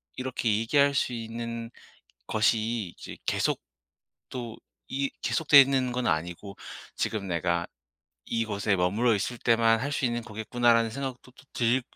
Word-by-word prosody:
이렇게 130 -2 -2
얘기할 140 +5 +3
수 130 - +1
있는 115 0 -5 0.6
것이 110 -3 +1
이제 - - -9
계속 - - +1 0.7
또 120 -3 -6 0.3
이 135 +1 -1
계속 160 - -1
돼 145 - +11
있는 130 -2 +1
건 125 0 -1
아니고 85 +5 -2 0.4
지금 105 -3 -2
내가 85 -1 0 0.6
이곳에 105 -3 0
머물러 105 +6 +2
있을 120 +5 -2
때만 115 -1 +3
할 145 +2 -2
수 - - -2
있는 120 -1 -1
거겠구나.'라는 115 +1 +2
생각도 130 -1 -6
또 130 - -19
들 120 +2 +2
115 Hz, 275 characters per minute, -27 LUFS, 110-125 Hz, 0.7 s, 돼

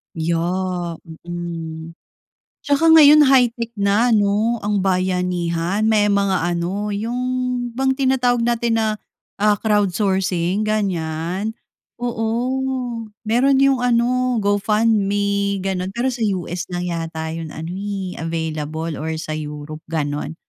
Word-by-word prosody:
Yeah, 175 +1 -1 0.3
mm. 165 -2 -6 0.7
Tsaka 290 +3 +3
ngayon 305 -1 +8
high-tech 245 -4 +3
na 205 +5 +3
'no, 215 +2 +2
ang 205 0 +1
bayanihan 180 0 0
may 210 -2 +3
mga 200 -3 +1
ano, 195 +5 -2
yun 245 +3 -2
bang 265 +1 +1
tinatawag 250 -3 +2
natin 235 -1 +1
na, 220 - +1 0.5
ah, 210 0 +4
crowd 205 -4 +1
sourcing, 190 0 0
ganyan, 185 0 -2 0.4
oo, 245 +1 -2 0.2
meron 255 +5 +3
yung 275 -2 +3
ano, 250 +1 +1
GoFundme, 205 -1 +1
gano'n. 190 -1 -2
Pero 255 +2 0
sa 250 - -6 0.2
US 175 -1 -4
lang 180 0 -4
yata 165 -2 -4
yung 165 0 -5
ano 160 +2 -6
eh, 195 -2 -4
available 160 -1 -3
or 160 +1 -3
sa 155 0 -5
Europe, 150 0 -7
gano'n. 150 -1 -3
200 Hz, 115 wpm, -20 LUFS, 170-235 Hz, 0.7 s, ngayon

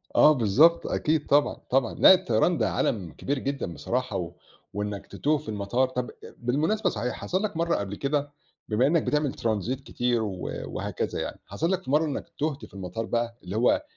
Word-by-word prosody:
آه 150 - +8
بالضبط 145 +8 +4
أكيد 155 -1 0
طبعًا، 145 +1 +3
طبعًا، 125 -3 +2
لا - - +8
الطيران 170 0 +2
ده - - +1
عالم 95 -8 -1
كبير 140 - -3
جدًا 135 -10 -3
بصراحة 75 -2 -2
و - - -4 0.4
وإنّك 105 0 -4
تتوه 150 +1 0
في 150 - -9
المطار 105 +5 0
طب 125 -1 -3
أ - - -13
بالمناسبة 150 - +1
صحيح، 120 +3 -2
حصل 185 +3 -2
لك 205 -6 -2
مرة 170 +1 +1
قبل 100 0 -3
كده 145 +3 -1 0.4
بما 115 +4 +3
إنّك 165 +1 +2
بتعمل 150 -2 0
ترانزيت 115 +4 -2
كتير 120 -3 0
و 95 -4 -4
وهكذا - - -3
يعني، - - -5
حصل 160 - -1
لك 190 -1 0
في 130 - -5
مرة 155 +3 +4
إنّك 145 - -4
تُهت 150 -1 -2
في - - -19
المطار 100 +4 -4
بَقى، 115 0 -2
اللي 90 +2 -6
هو 120 - +3
130 Hz, 195 wpm, -26 LUFS, 110-150 Hz, 0.4 s, آه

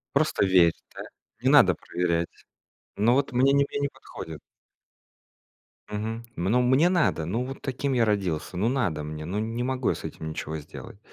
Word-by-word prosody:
Просто 150 -6 +2
верь, 90 -3 +5 0.2
да? - - -6 0.4
Не - - +2
надо - - +7
проверять. 85 -1 -1 0.7
Ну, 115 +4 +3
вот 135 +1 +1
мне 130 +3 +4
не 140 0 +4
мне - - -3
не 140 - +1
подходит. 80 -2 -9 1.5
Мгм. 110 +2 -4
М, 85 - -3
ну, 115 +7 +3
мне 130 +7 +4
надо, 170 - +1
ну, 115 +9 -1
вот 135 +1 -8
таким 135 +1 -2
я 120 -2 +3
родился, 95 -4 -1
ну, 105 +6 +1
надо 105 - 0
мне, 75 +1 -6
ну, 90 +6 -3
не 115 +3 -2
могу 130 -1 -1
я - - +2
с - - -10
этим 80 - -6
ничего 80 0 -5
сделать. 75 +6 -11
110 Hz, 185 wpm, -26 LUFS, 85-130 Hz, 1.5 s, надо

